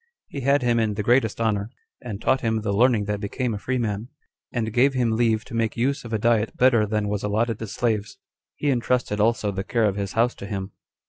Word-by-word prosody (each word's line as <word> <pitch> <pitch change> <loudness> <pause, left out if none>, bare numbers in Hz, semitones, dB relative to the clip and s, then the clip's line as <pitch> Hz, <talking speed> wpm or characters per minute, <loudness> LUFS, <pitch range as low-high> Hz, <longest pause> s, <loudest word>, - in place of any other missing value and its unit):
He 140 - -5
had 140 +1 +2
him 120 -1 +2
in 110 -2 0
the 105 - -2
greatest 120 -1 +2
honor, 105 -2 0 0.3
and 110 -5 -6
taught 130 +3 +1
him 110 -2 0
the 105 -1 -1
learning 115 -1 +3
that 105 0 -2
became 115 +4 -2
a 105 - -4
free 130 +4 -2
man, 110 -2 -2 0.4
and 110 -3 -2
gave 135 +3 +3
him 120 -3 +1
leave 110 -1 +1
to - - -12
make 115 -1 -1
use 135 +4 0
of 115 - -9
a 110 - +1
diet 115 0 +1
better 120 -4 +4
than 105 0 -1
was 105 0 -2
allotted 110 +2 0
to 115 - -5
slaves. 110 -1 -2 0.4
He 145 - 0
intrusted 120 -3 0
also 110 -1 +2
the 95 0 -3
care 115 0 +1
of 100 -1 0
his 100 -1 -3
house 120 +2 +2
to 100 - -7
him. 95 -1 -4
115 Hz, 235 wpm, -24 LUFS, 105-120 Hz, 0.4 s, better